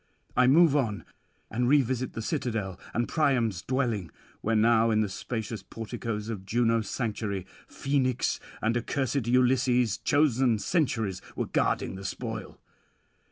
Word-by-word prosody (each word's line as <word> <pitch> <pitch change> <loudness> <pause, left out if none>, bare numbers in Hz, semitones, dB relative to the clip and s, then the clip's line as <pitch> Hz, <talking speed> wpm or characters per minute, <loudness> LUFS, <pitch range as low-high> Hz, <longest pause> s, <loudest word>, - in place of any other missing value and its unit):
I 125 0 +5
move 155 +2 +6
on, 115 -8 0 0.5
and 120 +2 +1
revisit 130 -3 +2
the 110 - -4
citadel 110 - -2
and 120 0 0
Priam's 120 - +1
dwelling; 120 -9 -1 0.3
where 115 +1 0
now 115 +1 +4
in 110 -1 +3
the 105 - +1
spacious 110 +1 -4
porticoes 110 0 -5
of 110 -5 -5
Juno's 115 +1 +1
sanctuary, 105 -5 -2 0.2
Phoenix 130 -3 0 0.2
and 115 +2 +2
accursed 130 +1 -1
Ulysses, 125 -2 +3
chosen 135 -5 +3
sentries, 110 - 0
were - - -1
guarding - - 0
the 95 - -8
spoil. 95 - -5
115 Hz, 130 wpm, -28 LUFS, 110-130 Hz, 0.5 s, move